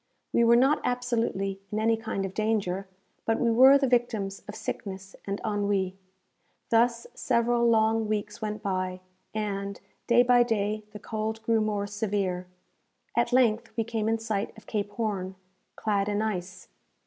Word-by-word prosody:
We 235 - +4
were 235 0 +6
not 270 +5 +4
absolutely 230 -6 -1
in 210 - -2
any 225 +1 +3
kind 220 -3 -3
of 190 - -6
danger; 200 -3 -1 0.4
but 225 0 +1
we 235 - +2
were 260 +4 +8
the 275 - +1
victims 230 -6 0
of 205 - -7
sickness 195 -2 -6
and 200 0 -2
ennui. 200 -3 0 0.8
Thus 235 0 +3
several 235 -1 +2
long 220 0 +3
weeks 210 0 -3
went 215 0 -4
by, 185 -1 -2 0.3
and, 200 -2 -3 0.3
day 240 0 +6
by 245 0 +5
day, 215 -2 0
the 210 - -8
cold 220 +1 -4
grew 225 -1 +2
more 210 -1 0
severe. 200 -3 -2 0.7
At 235 +1 +2
length 235 -2 +3
we 225 - +2
came 220 -1 -1
in 225 - +2
sight 220 -1 -3
of 220 - -14
Cape 205 -2 -2
Horn, 200 -4 -2 0.4
clad 205 -1 0
in 205 +1 0
ice. 185 -4 -4
215 Hz, 160 wpm, -28 LUFS, 200-230 Hz, 0.8 s, were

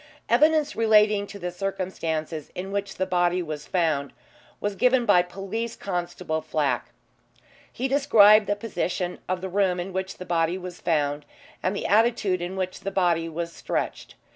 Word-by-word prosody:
Evidence 300 +4 +3
relating 210 -2 +4
to 200 - -9
the 180 -2 -4
circumstances 175 -5 -3
in 190 +2 -5
which 200 0 -3
the 185 - -1
body 180 -1 +1
was 150 -2 -6
found 155 -6 0 0.5
was 205 -1 -2
given 250 +2 +3
by 190 -5 +6
Police 195 +6 -5
Constable 175 -3 -3
Flack. - - -1 0.8
He 260 - -2
described 220 -7 +6
the 205 - +1
position 185 -4 -3
of 185 -1 -1
the 190 - -3
room 190 -1 +1
in 180 +2 -5
which 190 +1 -3
the 185 - -8
body 170 0 +1
was 180 -1 -8
found, 145 -3 0 0.4
and 185 +2 -1
the - - -4
attitude 210 -4 +2
in 175 +2 -4
which 185 -1 -3
the 195 - -4
body 175 -4 +1
was 170 +1 -4
stretched. - - -4
185 Hz, 165 wpm, -25 LUFS, 175-205 Hz, 0.8 s, by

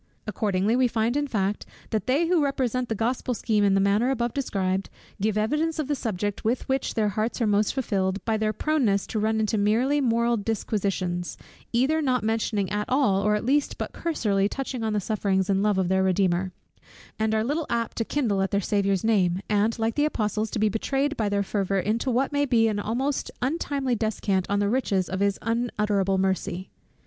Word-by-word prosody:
Accordingly, 210 0 0
we 255 0 +4
find 230 +1 0
in 290 0 0
fact, 205 -4 -1 0.3
that 220 +1 -1
they 280 +7 +2
who 335 -2 +2
represent 255 -3 -1
the 225 - -1
Gospel 245 +3 -1
scheme 215 -2 +1
in 195 -1 +4
the - - +3
manner 200 +5 +2
above 240 -3 -1
described, 195 -8 -1 0.3
give 215 0 +1
evidence 300 +10 0
of 305 -4 -2
the 295 - 0
subject 205 -6 -3
with 235 +3 -1
which 265 0 -1
their 215 -2 +2
hearts 215 +5 -2
are 235 - +2
most 205 0 +2
filled, 195 -7 -1
by 225 - +1
their 215 0 0
proneness 220 -6 +1
to 220 - -3
run 220 +1 +1
into 215 0 0
merely 245 +8 +2
moral 235 -1 +2
disquisitions, 195 -4 -2 0.3
either 270 +7 +2
not 255 -5 +1
mentioning 215 -2 0
at 210 0 -2
all, 255 -8 +3
or 210 +1 +2
at 210 - -3
least 280 +3 +1
but - - -5
cursorily 205 -12 0
touching 265 -1 -4
on 220 -1 -1
the 210 - +1
sufferings 195 -2 0
and 195 0 +2
love 210 -1 +2
of 190 -2 +1
their 190 +1 +2
Redeemer; 185 -1 +1 0.7
and 220 0 +1
are 220 - +1
little 295 +6 -1
apt 230 -1 -1
to 230 - +1
kindle 225 -7 0
at 195 - 0
their 200 - +1
Saviour's 200 -1 0
name, 190 -5 +2
and 210 +3 +2
like 225 0 0
the 295 - +2
apostles 215 -6 -1
to - - -4
be 215 0 +3
betrayed 275 +7 -1
by 215 -5 0
their 200 0 +1
fervor 195 -1 -1
into 220 +7 -1
what 255 +3 +1
may 285 0 +2
be 225 -3 +3
almost 235 +7 -2
an 265 +4 +1
untimely 280 -6 -1
descant 205 -4 -1
on 200 - +1
the 205 0 +1
riches 200 -5 0
of 190 - -3
his 200 0 +1
unutterable 210 -4 0
mercy. 190 -1 -1
220 Hz, 205 wpm, -25 LUFS, 200-250 Hz, 0.7 s, we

